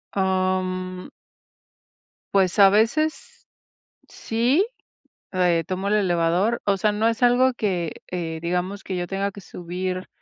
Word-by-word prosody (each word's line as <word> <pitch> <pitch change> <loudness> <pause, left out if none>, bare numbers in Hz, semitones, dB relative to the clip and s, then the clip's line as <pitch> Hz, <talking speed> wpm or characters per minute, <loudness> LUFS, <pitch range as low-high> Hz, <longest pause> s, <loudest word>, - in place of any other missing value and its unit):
Mm. 185 -1 -1 1.2
Pues 190 -1 +2
a 195 -1 +9
veces, 230 +10 0 0.6
sí, 245 - +1 0.7
eh, 180 -3 +2
tomo 190 +1 -3
el 205 - +2
elevador. 185 +3 +1
O 200 -1 +3
sea, 210 +2 +1
no 210 +2 0
es 230 +1 0
algo 250 +2 +4
que, 180 -8 -2
eh, 165 -3 -4
digamos, 180 +3 -2
que 185 - -4
yo 175 0 -2
tenga 195 +2 -2
que 200 - -11
subir 185 +1 -5
190 Hz, 130 wpm, -23 LUFS, 180-210 Hz, 1.2 s, a